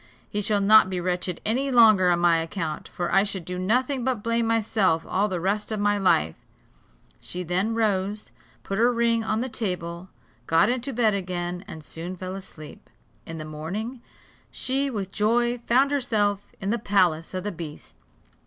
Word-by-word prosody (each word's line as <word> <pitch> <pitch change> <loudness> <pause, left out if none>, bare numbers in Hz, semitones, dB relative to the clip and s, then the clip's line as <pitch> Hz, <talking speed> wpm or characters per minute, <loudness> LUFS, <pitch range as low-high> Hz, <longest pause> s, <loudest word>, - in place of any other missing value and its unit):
He 205 - -2
shall 205 0 +1
not 210 -1 +6
be 185 -1 -2
wretched 180 0 -2
any 260 +6 +1
longer 215 -7 +6
on 175 - +3
my 175 -1 +4
account; 165 -1 -4
for 175 -1 -4
I 195 - +6
should 195 -4 -4
do 180 +1 -4
nothing 250 +7 0
but 250 -5 -1
blame 230 0 +1
myself 210 -7 +1
all 200 +3 +1
the 185 -4 -3
rest 205 +5 -1
of 215 - -2
my 205 0 +2
life," 80 - +2 0.9
She 180 0 -4
then 185 +6 0
rose, 210 -2 -1 0.3
put 195 +1 -3
her 240 +2 +4
ring 230 -1 +1
on 220 0 -1
the 255 - -2
table, 180 -6 -4 0.4
got 165 +6 +4
into 255 +2 -1
bed 225 -3 +2
again, 180 -2 -3
and 160 - -9
soon 170 +5 -7
fell 185 +1 -6
asleep. 175 -6 -11 0.4
In 165 -1 -6
the 155 - -6
morning 195 +11 -5 0.5
she 270 +2 -1
with 200 -6 -4
joy 240 +4 +1
found 265 +4 +4
herself 215 -7 +1 0.2
in 195 +1 -2
the 235 - 0
palace 185 -6 +1
of 185 - -3
the 210 - -3
beast. 160 -4 -9
200 Hz, 180 wpm, -25 LUFS, 180-230 Hz, 0.9 s, not